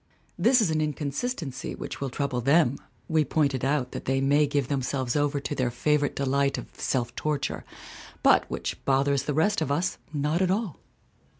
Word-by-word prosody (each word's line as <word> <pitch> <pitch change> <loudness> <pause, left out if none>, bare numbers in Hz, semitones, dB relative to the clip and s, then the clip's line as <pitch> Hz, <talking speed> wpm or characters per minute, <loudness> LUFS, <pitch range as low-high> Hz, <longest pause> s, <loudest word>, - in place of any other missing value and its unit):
This 235 +7 +4
is 185 -7 +2
an 155 0 +1
inconsistency 150 - -3
which - - -7
will 135 - -1
trouble 130 -1 -2
them 140 0 +3 0.3
(we 160 -1 +3
point 145 0 +1
it 130 - -3
out 135 -1 0
that - - -6
they 135 +1 +1
may 145 +2 +3
give 140 -2 0
themselves 130 -2 -1
over 145 0 +1
to 140 - -4
their 130 -3 0
favorite 145 +4 +1
delight 140 0 +1
of - - -5
self 120 -2 -2
torture) 150 -2 -2 0.6
but - - +5
which - - -4
bothers 140 0 +2
the 145 - -1
rest 185 +5 +2
of 140 - -1
us 170 +5 0
not 150 +3 0
at 185 - +2
all. 195 - -1
145 Hz, 185 wpm, -27 LUFS, 135-155 Hz, 0.6 s, but